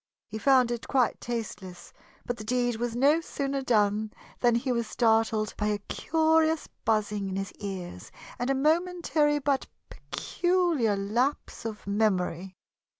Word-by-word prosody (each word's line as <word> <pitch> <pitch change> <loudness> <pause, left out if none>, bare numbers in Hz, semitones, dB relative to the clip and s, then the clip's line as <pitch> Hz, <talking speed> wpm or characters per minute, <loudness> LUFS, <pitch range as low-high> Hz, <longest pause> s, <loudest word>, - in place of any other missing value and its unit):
He 220 - -7
found 255 -1 +4
it 240 -1 -4
quite 255 -4 +1
tasteless, 200 -7 -6 0.3
but 245 - -3
the 215 - -7
deed 245 0 0
was 235 0 -2
no 285 +6 +4
sooner 275 -3 -3
done 215 -3 +1 0.3
than 240 -1 +3
he 250 +2 0
was 235 -2 -1
startled 220 -2 +2
by 210 - 0
a 210 -1 +1
curious 320 +7 +1 0.2
buzzing 210 -2 0
in 190 - -4
his 195 0 -3
ears 190 -4 -6 0.3
and 245 +2 -1
a 275 - +2
momentary 315 0 +2
but 280 -1 0 0.2
peculiar 345 - 0
lapse 230 +6 -1
of 215 -2 -6
memory. 190 -3 0
235 Hz, 145 wpm, -28 LUFS, 210-275 Hz, 0.3 s, found